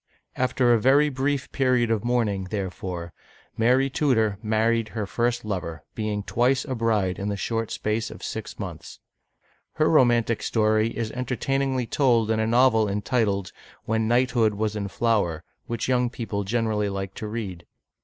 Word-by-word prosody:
After 125 -1 +2
a 115 - +2
very 140 +4 +5
brief 135 +1 -2
period 125 -4 +2
of 110 -3 0
mourning, 115 -6 0
therefore, 95 -3 -5 0.4
Mary 125 +4 +3
Tudor 115 -8 +1
married 115 +1 +1
her 110 -1 -4
first 120 +3 -1
lover, 90 -5 -4
being 105 -2 -2
twice 125 +5 +1
a 135 - -3
bride 110 -6 0
in 100 +1 -2
the 100 - -2
short 115 +2 -2
space 110 +1 -2
of - - -11
six - - -5
months. - - -8 0.7
Her 155 - +2
romantic 120 -6 +3
story 110 0 +2
is 115 -2 -2
entertainingly 130 +1 -1
told 115 -3 +2
in 110 - +1
a 110 - +1
novel 115 -2 +4
entitled, 100 -2 0 0.3
W/ien 110 0 0
Knight 125 +2 +2
hood 110 -4 +2
was 110 +1 -1
in 100 -1 -2
Flower^ 100 -8 0 0.3
which 115 +1 -3
young 125 -1 +2
people 110 -4 -4
generally 110 -1 0
like 95 -1 -4
to 110 - -6
read. 105 -6 -6
115 Hz, 160 wpm, -25 LUFS, 105-125 Hz, 0.7 s, very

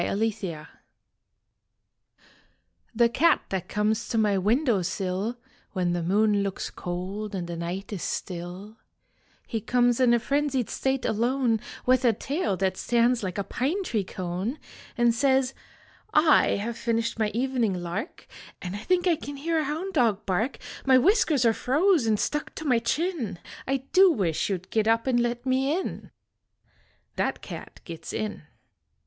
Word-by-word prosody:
THAT 195 - -1
CAT 165 -7 -7 2.3
The 235 +1 +5
cat 315 +6 +3
that 190 -3 -3
conies 215 +2 0
to 230 - -1
my 210 -2 +3
window 220 +3 +2
sill 190 +6 -2 0.4
When 180 -3 0
the 175 - -1
moon 205 +4 +2
looks 195 -1 -3
cold 195 +4 -5
and 180 -2 -3
the 170 - -5
night 175 +5 -4
is 190 - -4
still 185 +4 -5 0.7
He 225 - -3
comes 245 +1 +2
in 250 -2 +5
a - - +2
frenzied 275 -1 0
state 265 0 -1
alone 235 +1 +1 0.3
With 255 0 +4
a 235 -3 +5
tail 225 - -2
that 190 0 0
stands 240 0 +2
like 185 -2 -4
a 200 - 0
pine 305 - -1
tree 220 - -1
cone 185 - -4 0.4
And 240 -1 +4
says: 265 +1 +2 0.6
"I 305 0 +5
have 225 +3 -3
finished 230 -1 -1
my 215 -1 +2
evening 245 -5 +1
lark 175 - -5 0.3
And 180 +1 -5
I - - -4
think 355 - +1
I 350 -2 +4
can 285 -1 -7
hear 325 +3 0
a 310 - 0
hound 325 +7 -3
dog 230 - +2
bark. 210 +8 0 0.3
My 260 -1 +6
whiskers 300 - +3
are 230 - +5
froze 290 - +2
nd 215 -1 +2
stuck 295 0 -2
to 315 - -6
my 250 -5 +3
chin. 275 - -1 0.3
I 270 0 0
do 380 0 +7
wish 185 - 0
you 195 - +1
d 185 +1 -17
git 220 -1 +1
up 225 0 +3
and 255 -2 +2
let 240 +1 -1
me 265 +5 +1
in." - - -6 1.1
That - - -1
cat - - -9
gits 165 -2 -7
in. 215 -1 -3
230 Hz, 165 wpm, -26 LUFS, 195-265 Hz, 2.3 s, do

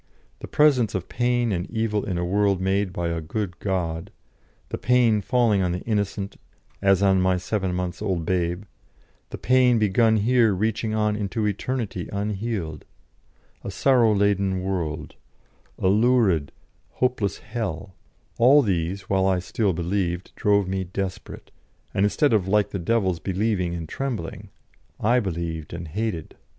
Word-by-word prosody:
The - - -8
presence 135 -8 +3
of 95 -1 -4
pain 120 -1 +1
and 90 -1 -2
evil 110 -2 -1
in 95 -4 -2
a 85 - -1
world 100 +1 +2
made 95 +1 0
by 85 -1 -2
a 85 -1 -2
good 90 +2 -4
God; 90 -2 -2 0.6
the - - -4
pain 120 -4 +3
falling 115 -2 +2
on 90 -2 0
the 90 - -4
innocent, 100 -2 -2 0.4
as 95 -1 +3
on 95 -1 +4
my 95 0 +2
seven 95 0 -2
months' 90 0 -3
old 95 -6 -1
babe; 90 +1 -1 0.7
the - - -6
pain 125 -1 +4
begun 110 +1 +3
here 115 -1 +3
reaching 110 +2 -1
on 105 -1 +1
into 105 +1 -2
eternity 105 -2 -3
unhealed; 100 -6 -3 0.8
a - - -5
sorrow 125 -5 +3
laden 100 -2 +1
world; 85 -5 -3 0.6
a - - 0
lurid, 105 - +3 0.4
hopeless 120 -6 0
hell; 100 -5 -5 0.5
all 135 +5 +6
these, 95 -2 -1
while 95 -1 +1
I 95 -1 +2
still 95 +3 0
believed, 90 +1 -2
drove 100 -2 +2
me 95 0 -1
desperate, 95 +1 -6 0.4
and 100 +1 +3
instead 140 +6 +2
of 100 -4 +2
like 105 +1 +2
the 100 - -3
devils 95 -2 0
believing 95 -2 -1
and 80 -2 -5
trembling, 120 - -5 0.5
I 120 +4 +3
believed 85 -6 -4
and 85 0 -6
hated. 95 -1 -4
100 Hz, 150 wpm, -24 LUFS, 90-110 Hz, 0.8 s, all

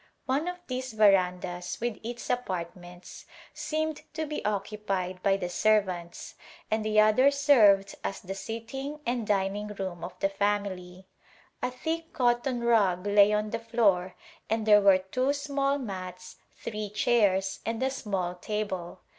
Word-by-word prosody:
One 280 +6 0
of 360 0 -3
these 255 -1 -4
verandas, 180 -4 +2
with 235 -2 -3
its 240 +1 -5
apartments, 180 -6 -5 0.3
seemed 315 -1 -2
to 315 0 -2
be 300 0 -5
occupied 195 -3 -2
by 195 0 +3
the 180 - -3
servants, 185 -3 0 0.4
and 220 0 +1
the 215 0 +2
other 215 +6 +5
served 230 -9 +4
as 195 - -3
the 190 +1 -6
sitting 270 +8 -6
and 240 -2 -1
dining 200 +1 0
room 190 -4 -5
of 180 0 -7
the 195 - +1
family. 195 -2 -2 0.6
A - - 0
thick 325 +6 -4
cotton 245 -1 +1
rug 200 -6 +3
lay 205 0 +5
on 210 0 0
the 230 - -2
floor 205 -6 +1 0.3
and 220 0 0
there 210 -1 +7
were 195 -2 +6
two 255 +9 -1
small 280 -1 0
mats, 185 -7 -7
three 210 -1 -6
chairs, 200 -3 +2
and 230 +2 -2
a 265 - +1
small 195 -8 -2
table. 185 -2 -4
210 Hz, 145 wpm, -28 LUFS, 190-245 Hz, 0.6 s, there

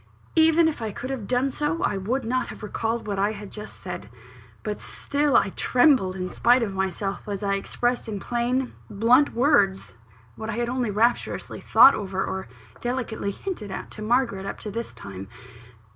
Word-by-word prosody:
Even 325 0 +5
if 310 -6 -2
I 220 - -2
could 255 +6 -5
have 235 -7 -4
done 255 +2 +1
so, 300 +6 -1
I 205 - +1
would 230 +7 -1
not 255 +3 0
have - - -9
recalled 225 +2 -2
what 200 -2 -2
I 205 +2 +2
had 205 -1 -9
just 210 0 -8
said; - - -7 0.5
but 210 -2 -3
still, 285 -2 +1
I - - +3
trembled 245 -8 +3
in 185 -1 -3
spite 240 +5 +3
of 200 -3 -2
myself 190 +1 -2
as 200 -1 -4
I 200 0 +1
expressed 240 +4 -1
in 205 -2 -3
plain, 245 +4 -1 0.2
blunt 240 +7 +4
words 230 -7 +3 0.4
what 220 - -6
I - - -1
had 240 0 -1
only 250 -2 -1
rapturously 225 +4 0
thought 275 - +7
over, 190 -2 -2
or 190 0 -4 0.3
delicately 240 -4 -2
hinted 215 - -5
at 190 - -6
to 215 - -9
Margaret, 230 -3 +1
up - - -4
to 210 - -5
this 230 +3 -4
time. 95 0 -9
225 Hz, 185 wpm, -25 LUFS, 200-255 Hz, 0.5 s, thought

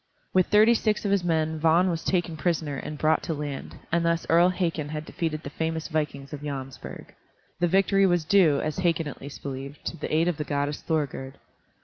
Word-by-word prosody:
With 185 -1 +4
thirty 215 +3 +6
six 215 -2 0
of 200 - +1
his 200 -3 +2
men 160 -2 0
Vagn 165 +4 +4
was 165 -1 -3
taken 175 -3 0
prisoner 155 -3 -1
and 150 +3 -6
brought 155 +2 +2
to 165 - -3
land, 145 -2 -6
and 170 +1 +2
thus 170 0 +1
Earl 170 +2 +6
Hakon 170 -5 -1
had 155 0 -5
defeated 155 -2 -3
the 140 - -7
famous 160 +1 -3
vikings 150 -3 -3
of 145 - -6
Jomsburg. 135 -3 -7 0.5
The 175 - +3
victory 195 +2 +4
was 175 -3 +1
due, 165 -7 +4
as 155 -1 -3
Hakon 165 -3 +1
at 145 - -8
least 140 +1 -9
believed, 135 +1 -7
to 170 - -4
the - - -5
aid 160 +2 +3
of 175 -4 0
the 150 - -2
goddess 145 0 -2
Thorgerd. 140 -4 -2
160 Hz, 210 wpm, -26 LUFS, 145-175 Hz, 0.5 s, thirty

